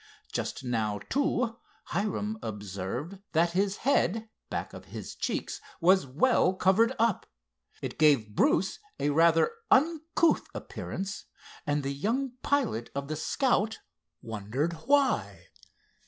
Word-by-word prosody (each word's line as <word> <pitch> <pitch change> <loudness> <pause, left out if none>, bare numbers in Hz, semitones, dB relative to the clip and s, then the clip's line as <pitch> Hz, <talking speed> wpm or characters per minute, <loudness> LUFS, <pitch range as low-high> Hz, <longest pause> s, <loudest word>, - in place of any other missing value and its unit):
Just - - -3
now, 110 -4 0
too, 255 -5 +1 0.3
Hiram 210 +2 -1
observed 105 - -5
that 170 +1 +3
his 195 +2 +1
head 225 -5 +2 0.2
back - - -4
of - - -10
his - - -7
cheeks - - -3 0.2
was 185 -3 +4
well 185 - +3
covered 200 +6 +4
up. 230 -3 +1 0.6
It - - -5
gave 140 -9 +4
Bruce 190 - +2 0.2
a 145 - +1
rather 165 - +4 0.2
uncouth 320 +3 +3
appearance 195 +1 -5 0.4
and 145 0 +1
the 135 +1 -2
young 235 - -1
pilot 240 - 0
of 140 0 -3
the 155 - -1
Scout 220 - +1 0.5
wondered 115 +9 -2
why. 280 -1 +2
185 Hz, 120 wpm, -29 LUFS, 140-230 Hz, 0.6 s, was